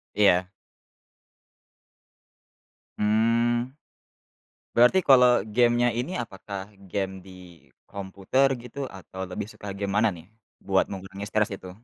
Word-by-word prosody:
Iya. 90 Hz, -3 st, +4 dB, 2.5 s
Mmm, 115 Hz, +4 st, +1 dB, 1.0 s
berarti 125 Hz, +10 st, +6 dB
kalau 125 Hz, -2 st, +7 dB, 0.2 s
game-nya 120 Hz, 0 st, +4 dB
ini 125 Hz, +9 st, -3 dB
apakah 100 Hz, -2 st, -7 dB, 0.2 s
game 95 Hz, -1 st, -3 dB
di 95 Hz, -, -14 dB, 0.6 s
komputer 100 Hz, +7 st, 0 dB, 0.2 s
gitu, 125 Hz, +3 st, -11 dB
atau 95 Hz, 0 st, -10 dB
lebih 100 Hz, +3 st, -4 dB
suka 105 Hz, -1 st, -9 dB
game 100 Hz, -1 st, -2 dB
mana 110 Hz, 0 st, +4 dB
nih, 85 Hz, -2 st, -11 dB, 0.4 s
buat -, -, +2 dB
mengurangi 95 Hz, +1 st, -7 dB
stres 110 Hz, +1 st, +1 dB
itu? 95 Hz, -1 st, -10 dB
105 Hz, 105 wpm, -26 LUFS, 95-120 Hz, 2.5 s, kalau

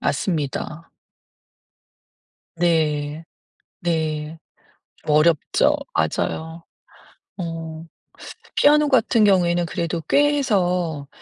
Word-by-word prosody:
맞습니다. 155 Hz, -1 st, -3 dB, 1.6 s
네. 155 Hz, -2 st, 0 dB, 0.6 s
네. 160 Hz, -2 st, -2 dB, 0.7 s
어렵죠. 155 Hz, +1 st, +3 dB, 0.2 s
맞아요. 160 Hz, +1 st, -2 dB, 0.8 s
어. 165 Hz, -2 st, -6 dB, 0.7 s
피아노 295 Hz, 0 st, +4 dB
같은 235 Hz, -3 st, +3 dB
경우에는 175 Hz, -4 st, +3 dB
그래도 170 Hz, 0 st, -3 dB
꽤 290 Hz, +1 st, +3 dB
해서 180 Hz, -, 0 dB
165 Hz, 150 characters per minute, -22 LUFS, 155-180 Hz, 1.6 s, 피아노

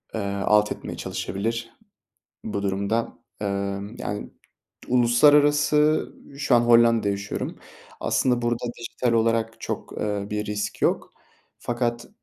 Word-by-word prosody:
eee, -, -, -1 dB, 0.3 s
alt 105 Hz, 0 st, +4 dB
etmeye -, -, -6 dB
çalışabilir. 115 Hz, +4 st, -3 dB, 0.7 s
Bu 100 Hz, -2 st, -3 dB
durumda, 100 Hz, +4 st, -1 dB, 0.3 s
emm, 100 Hz, +2 st, -3 dB
yani 105 Hz, 0 st, -4 dB, 0.6 s
Uluslararası 145 Hz, +5 st, +4 dB, 0.2 s
Şu 140 Hz, -3 st, +3 dB
an 120 Hz, -, +5 dB
Hollanda'da 115 Hz, -3 st, +5 dB
yaşıyorum. 100 Hz, 0 st, -4 dB, 0.4 s
Aslında 125 Hz, -2 st, +1 dB
burada 120 Hz, 0 st, -1 dB
dijital 120 Hz, 0 st, -1 dB
olarak 115 Hz, 0 st, +1 dB
çok, -, -, -5 dB
eee, 105 Hz, -1 st, -2 dB
bir 105 Hz, 0 st, -2 dB
risk 105 Hz, 0 st, -4 dB
yok -, -, 0 dB, 0.5 s
fakat, 120 Hz, -1 st, -2 dB
115 Hz, 115 wpm, -24 LUFS, 105-120 Hz, 0.7 s, an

